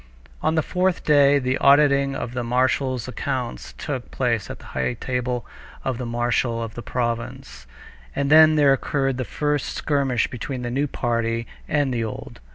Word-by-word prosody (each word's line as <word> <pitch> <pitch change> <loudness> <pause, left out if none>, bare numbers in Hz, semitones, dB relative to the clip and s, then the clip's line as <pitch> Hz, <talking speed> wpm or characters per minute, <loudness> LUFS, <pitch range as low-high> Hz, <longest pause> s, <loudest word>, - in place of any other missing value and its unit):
On 160 - +1
the 160 - +2
fourth 185 +2 0
day 145 -1 +5
the 130 -1 0
auditing 140 -1 +4
of 120 - -4
the 125 -1 -2
marshal's 130 +1 0
accounts 130 -1 -4
took 130 -5 -5
place 115 -6 -1
at - - -6
the - - -16
high 65 - -1
table 125 -1 -2 0.4
of 130 -2 -2
the 125 - -4
marshal 120 0 0
of 115 -1 -6
the 120 - -7
province. 120 - -4 0.5
And 140 0 0
then 155 0 +8
there 145 -2 +5
occurred 135 -1 -1
the 130 - -2
first 145 +1 -1
skirmish 135 -5 +1
between 125 +1 -5
the 120 - -3
new 140 +4 0
party 115 -2 -1 0.2
and 145 -3 +1
the 115 -1 -1
old. 110 - -7
130 Hz, 170 wpm, -23 LUFS, 120-140 Hz, 0.5 s, then